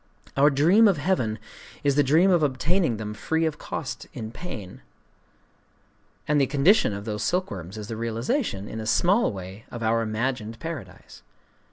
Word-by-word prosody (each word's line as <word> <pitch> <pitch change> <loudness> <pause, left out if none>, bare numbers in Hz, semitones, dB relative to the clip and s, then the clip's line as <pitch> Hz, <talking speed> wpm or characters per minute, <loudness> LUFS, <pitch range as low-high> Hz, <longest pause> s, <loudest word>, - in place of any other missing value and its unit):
Our 140 +2 +6
dream 170 +11 +5
of 195 -5 +3
heaven 135 - 0 0.5
is 140 - +3
the 145 - +4
dream 160 +8 +4
of 175 -3 +4
obtaining 150 - +1
them 105 0 -5
free 160 +9 -1
of 155 -2 -2
cost - - -5
in 110 0 -5
pain; 115 - -8 1.5
and 150 -1 +3
the 135 - +3
condition 145 - +4
of 100 0 -6
those 105 -2 -3
silkworms 105 - -2
is 105 -1 -6
the 115 - -5
realization, 115 - -2
in 110 - -6
a 110 - -5
small 195 - +3
way, 95 +2 -9
of 120 -1 -6
our 115 +1 +2
imagined 115 0 -2
Paradise. 135 - -8
130 Hz, 165 wpm, -25 LUFS, 110-160 Hz, 1.5 s, Our